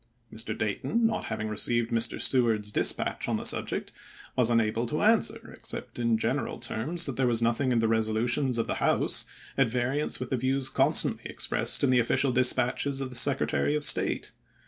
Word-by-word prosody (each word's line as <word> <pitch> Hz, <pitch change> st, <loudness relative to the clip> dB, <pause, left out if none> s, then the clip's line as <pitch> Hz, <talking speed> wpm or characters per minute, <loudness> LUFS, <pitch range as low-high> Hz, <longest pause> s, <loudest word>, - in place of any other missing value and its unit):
Mr. 110 Hz, +2 st, -4 dB
Dayton, 225 Hz, -, -1 dB
not 225 Hz, -1 st, -1 dB
having 110 Hz, -, -4 dB
received 115 Hz, +2 st, +1 dB
Mr. 115 Hz, 0 st, +1 dB
Seward's 115 Hz, -5 st, +1 dB
dispatch -, -, 0 dB
on -, -, 0 dB
the -, -, -7 dB
subject, -, -, -1 dB, 0.4 s
was 125 Hz, -2 st, +4 dB
unable 115 Hz, 0 st, 0 dB
to 150 Hz, -, -2 dB
answer, 220 Hz, +1 st, +1 dB
except -, -, -7 dB
in 115 Hz, -1 st, +1 dB
general 110 Hz, -, -2 dB
terms 165 Hz, +10 st, -2 dB
that 135 Hz, -4 st, -5 dB
there 130 Hz, -1 st, +1 dB
was 115 Hz, -2 st, +3 dB
nothing 120 Hz, +3 st, 0 dB
in 120 Hz, -, +1 dB
the 115 Hz, -1 st, +1 dB
resolutions 115 Hz, +3 st, 0 dB
of 115 Hz, -, 0 dB
the -, -, -4 dB
House -, -, +1 dB, 0.3 s
at 135 Hz, -4 st, +3 dB
variance 125 Hz, +5 st, -2 dB
with 125 Hz, -, -6 dB
the 130 Hz, -, 0 dB
views 130 Hz, +2 st, +2 dB
constantly -, -, +2 dB
expressed -, -, +1 dB
in 135 Hz, -, +3 dB
the 125 Hz, -, +4 dB
official 130 Hz, +3 st, +1 dB
dispatches 130 Hz, +2 st, +2 dB
of 135 Hz, -1 st, -5 dB
the -, -, -11 dB
Secretary 140 Hz, +3 st, +1 dB
of 150 Hz, -, 0 dB
State. -, -, 0 dB
120 Hz, 185 wpm, -27 LUFS, 115-135 Hz, 0.4 s, was